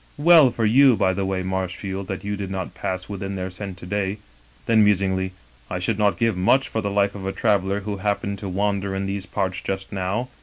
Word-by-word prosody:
Well 155 -2 +7
for 115 -2 -1
you, 130 +3 +6
by 95 -3 +2
the 95 0 -2
way, 95 -1 -1
Marshiield, 95 +1 -3
that 95 0 -5
you 105 +1 -2
did 100 -1 -5
not 95 -1 -4
pass 95 0 -4
within 100 -1 -5
their 95 0 -4
scent 95 0 -7
to 90 - -10
day.' 100 +1 -1 0.5
Then, 110 -2 +5
musingly: 95 -2 +2 0.4
'I - - -2
should 100 +4 -1
not 105 -1 +2
give 115 -3 +1
much 115 +9 +3
for 110 - -2
the 100 - -2
life 100 0 +1
of 95 -2 -6
a - - 0
traveler 100 -2 +1
who 100 0 -4
happened 100 0 -2
to 100 - -5
wander 100 0 -1
in 95 0 -2
these 100 0 -4
parts 95 -1 -2
just 95 0 -4
now.' 100 +6 -2
100 Hz, 225 wpm, -23 LUFS, 95-105 Hz, 0.5 s, Well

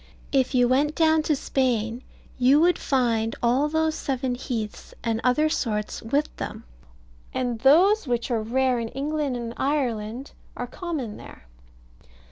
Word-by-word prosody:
If 265 -1 +1
you 245 -1 +5
went 285 +5 +2
down 315 -1 +4
to 305 - +4
Spain, 245 -4 -1 0.4
you 260 +4 +5
would 345 +2 +3
find 230 -4 +1
all 255 +5 +3
those 315 0 +1
seven 260 -4 -2
heaths, 235 -4 -5
and 225 -1 -1
other 280 +5 +3
sorts 215 -8 -2
with 280 +7 -1
them, - - -6 0.7
and 245 -3 -1
those 345 - +5
which 240 0 -1
are 230 -2 +1
rare 250 +2 +1
in 230 - -3
England 285 +1 -2
and 235 -1 -5
Ireland 250 -3 -2 0.3
are 245 - -3
common 275 - -5
there. - - -13
255 Hz, 145 wpm, -25 LUFS, 235-295 Hz, 0.7 s, you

